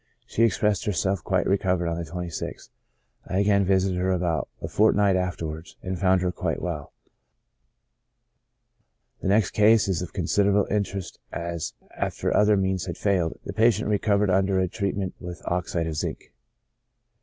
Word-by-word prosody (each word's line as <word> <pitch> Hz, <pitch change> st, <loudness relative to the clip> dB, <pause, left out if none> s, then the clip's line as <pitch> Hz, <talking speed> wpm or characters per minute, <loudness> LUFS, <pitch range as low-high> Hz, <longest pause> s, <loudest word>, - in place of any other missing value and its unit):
She -, -, -2 dB
expressed 105 Hz, -3 st, +2 dB
herself 95 Hz, -2 st, 0 dB
quite -, -, +1 dB
recovered 90 Hz, -3 st, +1 dB
on 85 Hz, 0 st, -2 dB
the 80 Hz, -, -11 dB
26th. 90 Hz, -1 st, -5 dB, 0.6 s
I 95 Hz, -, -2 dB
again 100 Hz, 0 st, +3 dB
vi 95 Hz, +1 st, +4 dB
sited 95 Hz, -1 st, 0 dB
her 95 Hz, +1 st, +1 dB
about 85 Hz, -3 st, 0 dB
a -, -, -5 dB
fortnight 105 Hz, -2 st, +3 dB
afterwards, 85 Hz, -3 st, -4 dB
and 95 Hz, -1 st, -3 dB
found 95 Hz, -1 st, +3 dB
her 90 Hz, -, +1 dB
quite -, -, -2 dB
well. -, -, -4 dB, 2.3 s
The -, -, -2 dB
next 100 Hz, +1 st, +3 dB
case 110 Hz, 0 st, +5 dB
is 95 Hz, -3 st, 0 dB
of 90 Hz, -2 st, -5 dB
considerable 100 Hz, +3 st, +2 dB
interest, 100 Hz, -2 st, -2 dB
as, 85 Hz, -1 st, -4 dB, 0.2 s
after -, -, -1 dB
other 105 Hz, 0 st, +5 dB
means 95 Hz, -1 st, 0 dB
had 85 Hz, -, -4 dB
failed, 90 Hz, -5 st, 0 dB
the -, -, -5 dB
patient 115 Hz, 0 st, +3 dB
recovered 105 Hz, -1 st, +2 dB
under 95 Hz, 0 st, +2 dB
a 95 Hz, -, +2 dB
treatment 100 Hz, 0 st, -2 dB
with 90 Hz, -1 st, -8 dB
oxide 85 Hz, -1 st, -1 dB
of 80 Hz, -1 st, -3 dB
zinc. -, -, -5 dB
95 Hz, 155 wpm, -25 LUFS, 90-100 Hz, 2.3 s, case